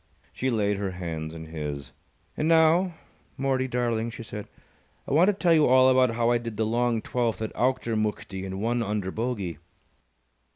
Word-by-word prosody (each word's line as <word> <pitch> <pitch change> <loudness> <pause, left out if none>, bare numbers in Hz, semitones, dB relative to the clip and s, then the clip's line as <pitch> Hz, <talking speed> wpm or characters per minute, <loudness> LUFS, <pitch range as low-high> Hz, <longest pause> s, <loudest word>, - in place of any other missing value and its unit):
_ - - -40 0.3
She 130 - -1
laid 105 -4 +1
her 100 -2 -3
hands 80 -3 -5
in 80 0 -8
his. 75 -5 -5 0.4
"And 155 - -1
now, 165 +2 +4 0.4
Mortie, 135 -1 0
darling," 120 -2 -1
she 115 0 -8
said, 105 -2 -7 0.6
"I - - -2
want 165 +6 +5
to 210 - +4
tell 180 -3 +3
you 155 -2 +5
all 130 +1 +6
about 130 -3 +3
how 120 0 +2
I 120 - +3
did 115 -3 -6
the 110 - +1
long 115 0 0
twelfth 120 -3 -1
at 110 -1 -4
Auchtermuchtie 110 -6 -1
in 95 0 -5
one 120 +3 0
under 105 -3 -2
bogey." 105 - -3
115 Hz, 180 wpm, -26 LUFS, 100-130 Hz, 0.6 s, all